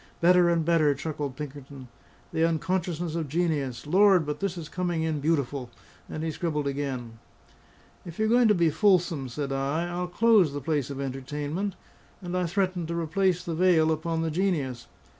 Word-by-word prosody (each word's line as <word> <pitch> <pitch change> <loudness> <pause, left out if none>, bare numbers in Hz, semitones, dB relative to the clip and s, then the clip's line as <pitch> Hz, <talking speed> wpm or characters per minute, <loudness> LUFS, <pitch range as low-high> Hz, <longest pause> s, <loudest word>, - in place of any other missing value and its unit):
"Better 175 0 +5
and 165 -2 +1
better!" 155 -4 +3
chuckled 145 -2 -4
Pinkerton. 140 -2 -8 0.5
"The 160 - +1
unconsciousness 170 0 -1
of 165 -2 -2
genius. 145 -6 -1
Lord, 190 +1 +5
but 150 0 -4
this 195 -2 -2
is 165 -3 -6
coming 175 -2 -2
in 160 -2 -1
beautiful!" 140 -4 -1 0.4
and 155 - -5
he 160 - -1
scribbled 150 -2 -2
again. 135 -5 -4 0.8
"If 170 -2 -10
you're 220 - +1
going 240 +1 +5
to 210 - +4
be 170 -3 +3
fulsome," 175 - +2
said 140 +2 -4
I, 140 +5 -1
"I'll 175 +1 -3
close 200 -4 +4
the 145 - -3
place 145 -2 -1
of 140 -1 -6
entertainment." 145 +8 -3 0.4
And 180 -2 -5
I 180 -1 0
threatened 185 -2 -1
to 170 +1 -2
replace 180 +2 +1
the 170 - -4
veil 160 -2 +4
upon 160 +1 -1
the 160 - -1
Genius. 145 -10 -1
160 Hz, 175 wpm, -27 LUFS, 145-180 Hz, 0.8 s, Better